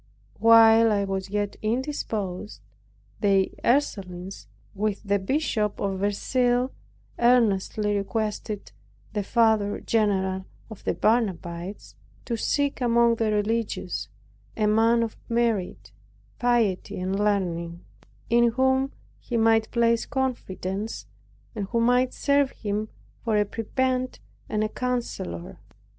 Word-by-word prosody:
While 225 0 +7
I 200 -1 +2
was 195 -1 -3
yet 205 0 -2
indisposed, 215 - -3 0.6
the 195 -2 +3
Ursulines, 195 -8 -1 0.3
with 205 0 -2
the 200 -1 +1
Bishop 215 -2 -1
of 195 -1 -2
Verceil, 245 +5 +1 0.5
earnestly 215 -3 +2
requested 210 0 -3 0.4
the 210 - 0
Father 220 -1 +2
general 190 -4 0 0.3
of 220 - -10
the - - 0
Barnabites, 190 -4 -1 0.3
to 235 - -2
seek 285 +5 0
among 235 -1 +3
the 225 -1 +1
religious, 210 - -1 0.5
a 215 - +2
man 225 +2 +4
of 225 - -5
merit, 230 -5 -1 0.5
piety 235 -9 +1
and 190 +2 -2
learning, 175 -5 -1 0.5
in 235 0 +3
whom 265 +2 +2 0.3
he 240 - -3
might 225 -1 +3
place 235 -1 +2
confidence, 205 - -3 0.5
and 205 -3 -4
who 235 +3 0
might 245 +2 +3
serve 280 -1 +2
him 210 -1 -3 0.3
for 220 -3 +1
a 210 - +3
prebend 255 +4 -1 0.3
and 215 0 0
a 215 - -1
counselor. 235 - -4
215 Hz, 115 wpm, -25 LUFS, 200-235 Hz, 0.6 s, While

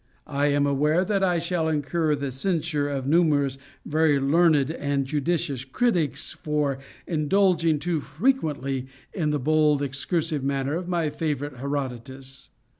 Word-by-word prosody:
I 145 0 0
am 145 0 +2
aware 150 +6 +2
that 195 0 0
I 180 -2 +2
shall 170 -1 -1
incur 155 +1 0
the 140 -1 -4
censure 150 0 -1
of 135 -2 -3
numerous 145 -3 +2 0.3
very 155 -2 +2
learned 150 0 +3
and 140 -3 -1
judicious 145 -2 -1
critics 170 - 0
for 150 -3 -1 0.3
indulging 165 0 +2
too 165 +1 -1
frequently 145 - -1 0.3
in 165 -6 0
the 150 - +1
bold 150 +1 +2
excursive 150 +2 -1
manner 135 0 -1
of 175 +1 -4
my 170 -4 0
favorite 145 -3 -3
Herodotus. 135 0 -5
150 Hz, 135 wpm, -25 LUFS, 140-165 Hz, 0.3 s, learned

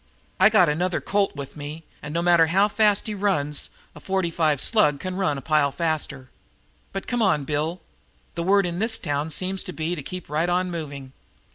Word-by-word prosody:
"I 190 +3 +7
got 210 -5 +5
another 175 +4 0
Colt 200 -3 0
with 140 -2 -7
me, 150 +2 -7 0.2
and, 150 - -7
no 170 +2 -1
matter 170 -2 +5
how 195 +5 +3
fast 210 -1 +2
he 215 - -3
runs, 185 -8 0 0.2
a - - -12
forty 190 -3 -1
five 155 -4 +1
slug 150 - +3
can 185 +3 -4
run 185 -7 0
a - - -6
pile 150 0 +2
faster. 150 -5 -3 0.6
But 195 - -5
come 245 -1 -1
on, 185 -9 +2
Bill. 155 +5 -2 0.5
The 170 - -4
word 195 +2 +3
in 175 0 -3
this 225 +1 +2
town 145 +2 -2
seems 185 +4 0
to 180 - -6
be 160 +2 -2
to 165 - -4
keep 180 +5 -7
right 155 +4 0
on 180 +1 0
moving." 140 -5 -6
170 Hz, 205 wpm, -24 LUFS, 150-190 Hz, 0.6 s, I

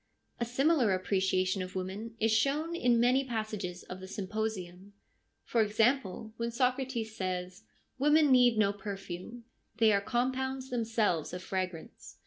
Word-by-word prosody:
A 235 - 0
similar 255 - +2
appreciation 185 0 0
of 185 0 -6
women 195 +5 -5
is 225 0 +2
shown 285 +9 +1
in 245 -7 +3
many 250 +3 +4
passages 215 -7 -4
of 185 - -8
the 190 - -9
Symposium; 200 -1 -4 0.5
for 230 - +1
example, 220 -1 +1
when 230 0 -1
Socrates 250 -2 -1
says, 185 +1 -4 0.2
' - - -40
Women 295 +1 +5
need 245 -3 +5
no 200 -2 +3
perfume: 200 +2 -7 0.3
they 225 -2 +5
are 200 - +2
compounds 260 +3 -2
themselves 225 -9 0
of 180 0 -5
fragrance.' 185 -3 -5
220 Hz, 140 wpm, -31 LUFS, 190-245 Hz, 0.5 s, Women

